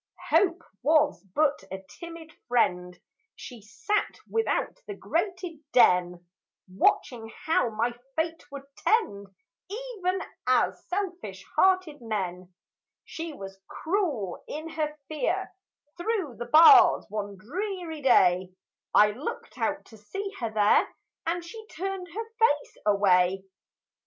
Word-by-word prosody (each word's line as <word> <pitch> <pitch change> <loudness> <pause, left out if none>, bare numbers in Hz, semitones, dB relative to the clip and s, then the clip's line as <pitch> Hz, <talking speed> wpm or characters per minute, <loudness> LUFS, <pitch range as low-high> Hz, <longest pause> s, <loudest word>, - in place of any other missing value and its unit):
Hope 345 +1 +3 0.2
Was 300 +1 +3
but 295 -7 +2
a 190 0 -6
timid 335 -2 -10
friend; 180 -7 +1 0.4
She 245 -4 -10
sat 410 - -2
without 455 +2 -1
the 410 - -5
grated 355 -2 -3
den, 180 -6 +4 0.4
Watching 225 +4 0
how 320 -6 +2
my 230 +2 -1 0.2
fate 325 +1 -2
would 280 -1 -7
tend, 200 - +1 0.4
Even 410 -5 -3 0.3
as - - +2
selfish 355 - -4
hearted 370 -7 +2
men. 185 -5 -4 0.5
She 330 0 -6
was 195 -5 -10
cruel 310 - -2
in 310 +2 -6
her 300 -1 -3
fear; 360 +5 -2 0.5
Through 365 - -2
the 240 0 -6
bars 345 +2 +8
one 205 -1 -5
dreary 340 - -5
day, 185 -8 +4 0.4
I 210 0 +7
looked 250 +8 -7
out 295 0 -1
to 220 - -15
see 390 - -5
her 230 -3 -2
there, 210 -1 +3 0.4
And 340 +1 -1
she 440 +5 -9
turned 380 0 -5
her 425 +7 -5
face 295 -11 +2
away! 190 -2 +3
300 Hz, 120 wpm, -27 LUFS, -, 0.5 s, bars